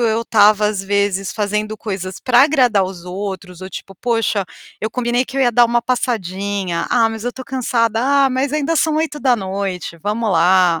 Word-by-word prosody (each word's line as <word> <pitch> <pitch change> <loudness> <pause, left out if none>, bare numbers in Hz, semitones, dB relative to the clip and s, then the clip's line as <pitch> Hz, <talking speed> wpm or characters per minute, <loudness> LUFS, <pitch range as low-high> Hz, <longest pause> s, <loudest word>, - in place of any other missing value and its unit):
eu 230 -1 +1
estava, 210 -1 +4
às 205 -2 -2
vezes, 200 -1 0
fazendo 210 +1 -2
coisas 190 -3 -5
para 245 -1 +5
agradar 250 -9 +3
os 185 -2 -8
outros 185 -1 -6
ou 185 - -7
tipo: 195 0 -9
"Poxa, 225 -3 -1 0.3
eu 220 - -2
combinei 245 +1 0
que 275 - -8
eu 270 - +2
ia 240 -2 +2
dar 240 +1 +5
uma 235 0 +1
passadinha. 200 -7 -2
'Ah, 230 -2 +3
mas 225 0 -7
eu 245 - 0
estou 260 +1 -10
cansada.' 230 -4 0
Ah 275 0 +3
mas 260 +2 -1
ainda 305 +2 0
são 310 0 +1
20h, 200 - -2
vamos 215 +1 -1
lá". 175 0 +4
215 Hz, 185 wpm, -18 LUFS, 195-245 Hz, 0.3 s, para